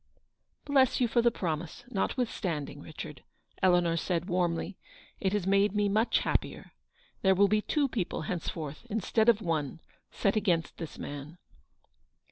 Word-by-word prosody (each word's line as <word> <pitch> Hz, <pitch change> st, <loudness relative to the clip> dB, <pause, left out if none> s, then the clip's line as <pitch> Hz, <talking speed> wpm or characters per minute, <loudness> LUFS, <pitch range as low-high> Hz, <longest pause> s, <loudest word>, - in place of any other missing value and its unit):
u 285 Hz, -, -4 dB
Bless 265 Hz, -2 st, +5 dB
you 245 Hz, -, +3 dB
for 235 Hz, +1 st, +3 dB
the 235 Hz, -, +5 dB
promise, 165 Hz, -6 st, -4 dB
notwithstanding, 190 Hz, -, -2 dB
Richard," 150 Hz, -4 st, -8 dB, 0.4 s
Eleanor 175 Hz, -3 st, +4 dB
said, 170 Hz, 0 st, -1 dB
warmly. 175 Hz, +1 st, 0 dB, 0.4 s
"It 190 Hz, -, +1 dB
has 205 Hz, -4 st, 0 dB
made 200 Hz, +1 st, +3 dB
me 205 Hz, -1 st, +2 dB
much 220 Hz, +4 st, +2 dB
happier. -, -, -2 dB, 0.5 s
There 190 Hz, -1 st, +4 dB
will 200 Hz, +2 st, +5 dB
be 215 Hz, +1 st, +2 dB
two 290 Hz, +5 st, +1 dB
people 200 Hz, -10 st, -2 dB
henceforth, 155 Hz, -3 st, -4 dB
instead 220 Hz, +2 st, +2 dB
of 220 Hz, -2 st, +3 dB
one, 160 Hz, -4 st, -1 dB, 0.3 s
set 200 Hz, -, 0 dB
against 180 Hz, -6 st, +1 dB
this 165 Hz, -3 st, -6 dB
man." 145 Hz, +4 st, -7 dB
185 Hz, 145 wpm, -30 LUFS, 165-215 Hz, 0.5 s, Bless